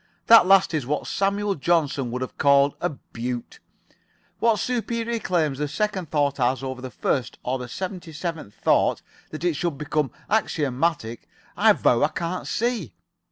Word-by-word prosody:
That 230 -5 +8
last 195 -2 +5
is 145 -6 -1
what 150 +2 -1
Samuel 200 +1 0
Johnson 145 -5 0
would 125 +2 -3
have 130 - -9
called 140 0 +4
a - - +1
beaut. 125 -3 -6 0.8
What 230 -2 +3
superior 235 0 -2
claims 155 -9 0
the 150 - 0
second 190 +1 -2
thought 145 -2 +1
has 130 +1 +1
over 130 -1 -5
the 130 - -6
first 125 +1 -2
or 130 +1 -1
the 125 - -6
seventy 185 - -6
seventh 155 - -5
thought, - - +2 0.3
that 155 +1 -7
it 175 -2 +2
should 165 -1 -2
become 150 -1 -1 0.2
axiomatic, 145 - -1 0.3
I - - +5
vow - - +2
I - - +5
can't 170 +2 -4
see. 225 - -2
155 Hz, 160 wpm, -24 LUFS, 135-190 Hz, 0.8 s, That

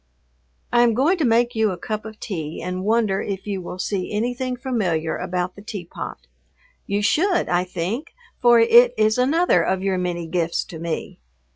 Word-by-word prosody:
I 240 - +5
am 235 -2 +4
going 320 +9 +2
to 305 - +2
make 235 +1 +3
you 220 -1 +2
a 185 - -4
cup 215 +4 -4
of 220 0 -9
tea 160 -7 -5
and 180 0 -4
wonder 215 -2 +1
if 195 -2 -4
you 200 -3 -3
will 180 - -7
see 185 0 -2
anything 245 +4 -2
familiar 195 - -1
about 180 0 -3
the 200 - -11
teapot. 180 - -7 0.6
You 205 +1 0
should, 350 - +2
I 180 +1 +1
think, 195 - -4 0.3
for 240 -1 +6
it 240 +2 +6
is 215 +2 +2
another 285 - +3
of 190 +2 -1
your 190 -2 0
many 175 -1 -2
gifts 170 0 -1
to 165 - -10
me. 165 0 -4
205 Hz, 180 wpm, -22 LUFS, 180-240 Hz, 0.6 s, for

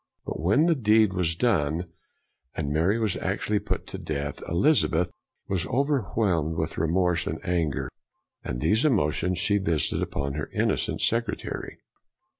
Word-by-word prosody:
But - - -4
when 105 - +3
the 170 - +4
deed 110 - +3
was 85 -3 +1
done, 85 -5 0 0.6
and 70 - -2
Mary 85 +8 +2
was 110 -4 0
actually 105 -1 -1
put - - -3
to - - -7
death, 70 -1 -4
Elizabeth 90 - +2 0.4
was 95 -3 -1
overwhelmed 110 - 0
with 80 0 -2
remorse 85 +1 +1
and 80 - -3
anger, 85 -6 0 0.6
and - - -4
these 105 - +2
emotions 90 - +1
she 100 +3 +2
visited 85 -6 0
upon 70 -1 -2
her 75 +1 -4
innocent - - 0
secretary. 115 0 -2
90 Hz, 140 wpm, -26 LUFS, 80-110 Hz, 0.6 s, the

